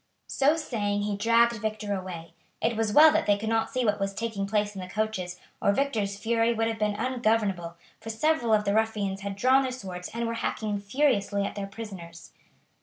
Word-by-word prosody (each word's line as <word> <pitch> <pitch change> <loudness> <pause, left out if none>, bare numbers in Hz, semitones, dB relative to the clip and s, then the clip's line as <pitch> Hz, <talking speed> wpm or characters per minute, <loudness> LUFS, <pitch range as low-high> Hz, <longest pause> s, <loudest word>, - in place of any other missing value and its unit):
So 285 +3 +2
saying 205 -9 -1
he 205 0 -1
dragged 230 +3 +3
Victor 215 -1 -2
away. 175 -4 -6 0.3
It 230 - 0
was 220 -1 0
well 305 +7 +8
that - - +1
they 205 -1 +4
could 220 +2 -3
not 225 0 +1
see 255 -2 -1
what 210 -1 +1
was 195 0 -2
taking 220 -3 -3
place 210 0 0
in 195 - -6
the 180 - -8
coaches, 190 -4 -3 0.2
or - - +4
Victor's 210 -6 -1
fury 230 +2 +1
would 225 0 +1
have 225 -1 -3
been 210 -1 0
ungovernable, 215 -7 0 0.2
for 225 - -8
several 240 +1 +1
of 210 -1 +3
the 200 - +1
ruffians 210 -3 0
had 200 0 -4
drawn 255 +6 +4
their 260 -1 -2
swords 185 -8 -7
and 235 +1 -3
were 230 - -2
hacking 210 -2 -2
furiously 200 -3 +1
at - - -4
their 200 -1 -5
prisoners. 190 -6 -9
215 Hz, 205 wpm, -27 LUFS, 200-230 Hz, 0.3 s, well